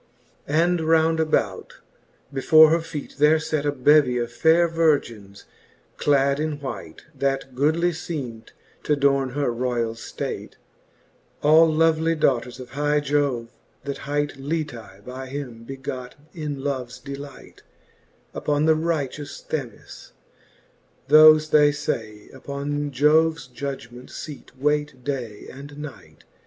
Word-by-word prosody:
xxxi. 150 - 0
And 175 -1 +1
round 160 0 +3
about, 160 -1 -1 0.6
before 155 +3 +6
her 165 - +3
feet 155 -4 -8
there 150 +2 +5
fate 155 -2 -2
A - - +2
bevie 140 -1 +4
of 120 -1 -2
faire 165 +6 +4
Virgins 130 -12 -1 0.5
clad 140 -1 +2
in 155 -1 -2
white, 100 - -7
That 135 -1 -2
goodly 160 +6 +2
feem'd 135 -9 -6 0.3
t'adorne 140 -3 +1
her 145 -3 0
royall 120 -2 -1
ftate, 115 - -6 0.9
All 160 +2 +6
lovely 160 +1 +2
daughters 125 -4 0
of 125 -1 -10
high 145 +1 +1
Jove^ 140 -5 0 0.3
that 140 0 -5
hight 145 -1 -1
Litcsy 135 -10 -5
by 130 +1 -7
him 130 -4 -7
begot 130 -1 -7 0.2
in 150 -5 -5
loves 130 -3 -3
delight 140 +1 -10 0.7
Upon 150 0 0
the 160 - +5
righteous 150 -3 -3
Themis: 135 -8 -7 1.0
thofe, 155 0 +7
they 150 -1 +6
fey. 110 -7 -4
Upon 145 +2 -4
Jo'ves 155 +2 +3
judgement 125 -1 -7
feat 150 -4 -9
wayt 150 -2 -1
day 120 -7 -5
and 140 +2 -11
night. 150 -2 -10
145 Hz, 120 wpm, -23 LUFS, 130-155 Hz, 1.0 s, thofe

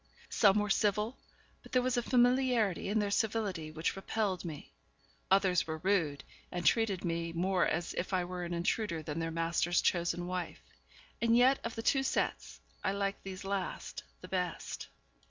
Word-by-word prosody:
Some 200 -1 +5
were 210 -1 +1
civil, 210 +4 +1 0.5
but - - -16
there 255 - +4
was 255 -1 +1
a 240 - +2
familiarity 245 -6 +2
in 210 - +1
their 205 -1 +1
civility 200 -7 0
which 160 +1 -2
repelled 195 -1 -1
me; 155 -5 -8 0.6
others 190 -3 +3
were 160 0 -3
rude, 160 -5 0 0.3
and 175 -2 -4
treated 195 +2 +2
me 170 0 -1
more 180 +1 +2
as 170 +1 -1
if 180 - -3
I 185 -2 +1
were 180 0 -5
an 175 - -5
intruder 170 -1 -1
than 150 +2 -4
their 165 0 -1
master's 165 +1 +1
chosen 175 0 +1
wife; 180 -1 -4 0.6
and 230 0 +4
yet 260 +2 +5
of 230 - -4
the 225 - -4
two 270 - +3
sets 270 - -1 0.2
I 190 - +1
liked 200 0 -2
these 190 -1 -7
last 195 -1 -3 0.2
the 180 - -9
best. 180 -2 -3
190 Hz, 175 wpm, -32 LUFS, 170-215 Hz, 0.6 s, Some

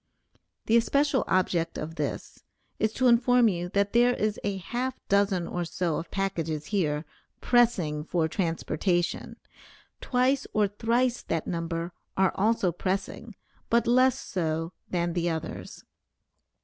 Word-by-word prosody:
The 225 - +4
especial 280 +3 +2
object 175 -3 +1
of 155 +2 -5
this, - - -5 0.4
is 220 - +1
to 255 - 0
inform 245 0 +5
you 175 -2 -3
that 200 +1 0
there 245 +1 +4
is 215 0 -1
a 200 -1 -1
half 245 +8 -3
dozen 195 -3 +2
or 175 - -2
so 170 -1 -2
of 165 - -6
packages 165 -6 -2
here, 155 -5 0 0.3
pressing 190 -12 +2
for 165 0 0
transportation; 175 +1 -1 0.7
twice 260 +2 +1
or 210 -1 +3
thrice 235 +4 0
that 165 -1 -2
number 165 0 -3 0.3
are 190 -1 +4
also 205 -3 +2
pressing, 195 +5 -3 0.3
but 235 0 +3
less 255 +2 +4
so 165 -1 -3 0.2
than 175 -1 -1
the 175 0 0
others. 160 -1 -6
190 Hz, 135 wpm, -27 LUFS, 170-235 Hz, 0.7 s, inform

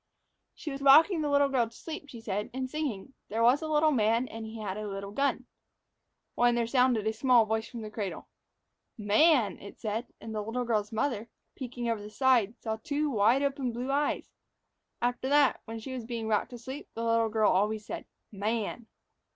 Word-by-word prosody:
She 305 - -6
was 275 0 -6
rocking 315 +5 +6
the 295 - -1
little 285 0 +4
girl 250 -4 +1
to 230 - -20
sleep, 310 -3 -7
she 235 -4 -9
said, 210 -1 -3
and 260 0 -2
singing, 270 -5 -4 0.2
"There 225 +2 0
was 250 +6 +5
a 315 - -3
little 310 0 +3
man, 230 0 +2
And 225 0 -7
he 220 +1 -8
had 200 -3 -4
a 215 0 -5
little 200 0 -5
gun," 260 +1 0 0.9
when 240 0 +3
there 235 -1 +1
sounded 250 -3 +2
a 220 - +1
small 245 0 +4
voice 220 +1 -2
from 235 -2 -7
the 215 - -7
cradle. 205 -4 -5 0.7
"Man," 215 - +3
it 200 - -11
said, 220 +2 -3
and 220 - -7
the 215 - -2
little 235 +4 -3
girl's 215 -3 0
mother, 225 -1 -1 0.3
peeking 245 -2 -5
over 225 -2 -1
the 210 - -8
side, 235 -2 +2
saw 220 -1 -3
two 290 +6 -1
wide 230 +5 +3
open 275 -3 -1
blue 250 +3 -3
eyes. 290 +1 0 0.7
After 245 +2 0
that, 285 -1 +4
when 225 0 -6
she 240 +4 -7
was 250 -2 -5
being 230 -1 -4
rocked 215 -2 +1
to 245 - -8
sleep, 260 +5 -8
the 230 - -3
little 230 -1 +2
girl 215 -1 +3
always 210 +2 +1
said, - - -6 0.3
"Man." 220 +2 -3
235 Hz, 200 wpm, -29 LUFS, 220-270 Hz, 0.9 s, rocking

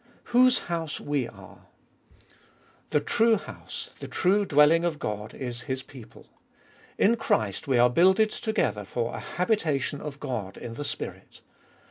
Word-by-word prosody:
Whose 255 +1 +6
house 165 -3 -3
we 145 -4 -1
are. - - -15 1.2
The 150 - +2
true 225 +8 +3
house, - - -8
the - - -6
true 200 +3 +2
dwelling 150 +1 +5
of 170 -3 0
Gqd, 105 -4 -5
is 120 -2 -5
His 130 0 -2
people. 125 -5 -14 0.7
In 230 +4 +4
Christ 110 - 0
we 130 -3 +3
are 120 +1 +6
builded 190 - +4
together 215 - -1
for 115 +4 -3
a - - -5
habitation 160 - -1
of 150 -1 -7
God 105 -9 -4
in 115 - -7
the 145 - -5
Spirit. - - -7
145 Hz, 145 wpm, -27 LUFS, 120-190 Hz, 1.2 s, Whose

